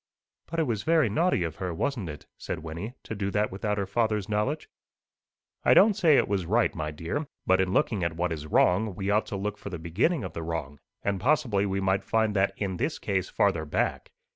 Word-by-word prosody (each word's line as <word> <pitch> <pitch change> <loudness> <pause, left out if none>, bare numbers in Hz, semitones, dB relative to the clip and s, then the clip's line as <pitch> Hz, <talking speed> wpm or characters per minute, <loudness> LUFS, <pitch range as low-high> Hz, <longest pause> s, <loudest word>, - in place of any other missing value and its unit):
'" - - -62
"But 165 - -2
it - - +4
was 115 -8 -1
very 160 -4 +3
naughty 165 - +2
of 80 -1 -4
her, 90 -2 -3
wasn't 110 - -2
it," 75 -1 -8
said 80 - -5
Wynnie, 85 +10 -6
"to - - -6
do 100 -2 -2
that 105 +1 0
without 105 +2 -2
her 100 - 0
father's 105 0 0
knowledge?" 105 +8 -1 1.0
"I - - +5
don't 215 +1 +7
say 170 -8 +4
it - - +3
was 95 -4 -1
right, 115 +4 +2
my 75 -1 -3
dear. 85 - -4 0.2
But 95 0 +4
in 95 -1 0
looking 100 -1 +1
at 85 -1 -1
what 90 0 0
is 75 -1 -4
wrong, 95 +6 +3
we 100 +2 -1
ought 105 +1 +2
to - - -4
look 105 +1 -3
for - - -7
the 90 - -5
beginning 105 - 0
of 90 -4 -6
the 85 - -4
wrong; 80 -4 -4 0.2
and 100 -2 -1
possibly 120 -7 +2
we 95 0 -1
might 95 0 +1
find 110 -2 +1
that 100 0 +2
in 95 -3 -2
this - - -1
case 95 -2 -1
farther 95 -6 +1
back. 75 - -2
100 Hz, 230 wpm, -27 LUFS, 90-110 Hz, 1.0 s, don't